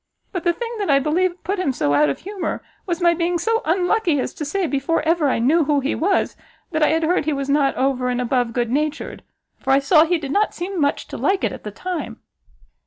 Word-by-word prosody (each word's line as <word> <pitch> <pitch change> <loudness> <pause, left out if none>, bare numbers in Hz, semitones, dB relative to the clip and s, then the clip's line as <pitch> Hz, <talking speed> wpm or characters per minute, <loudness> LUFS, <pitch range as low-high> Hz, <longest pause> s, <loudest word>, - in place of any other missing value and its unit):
But 360 -4 -4
the 345 - +4
thing 470 +6 -5
that 405 - -2
I 280 - +5
believe 350 +6 0
put 395 0 -2
him 320 -7 +1
so 145 - 0
out 145 +1 +4
of 140 - -2
humour, 390 -1 -4 0.2
was 350 0 -2
my 345 -1 +5
being 345 +1 0
so 450 +6 0
unlucky 355 -1 +1
as - - -3
to - - -6
say, 365 +6 -1
before 295 +2 0
ever 320 -2 +2
I - - +1
knew 290 +8 +3
who 290 0 +2
he 275 +2 -1
was, 380 +4 0 0.4
that 315 -2 -1
I 305 - +5
had 320 +1 +1
heard 335 -1 +1
he 310 - +1
was 275 0 -3
not 280 -1 +2
over 260 -1 0
and 250 0 -1
above 245 -1 0
good 235 -1 -1
natured; 300 +3 -2 0.4
for - - -6
I 270 - +6
saw 305 +3 +5
he 345 +2 +1
did 285 -4 -5
not 415 +6 +1
seem 360 0 -3
much 285 0 0
to - - -6
like 390 0 +1
it - - +1
at - - -9
the 210 - -5
time." 355 - -5
315 Hz, 245 wpm, -21 LUFS, 275-360 Hz, 0.4 s, I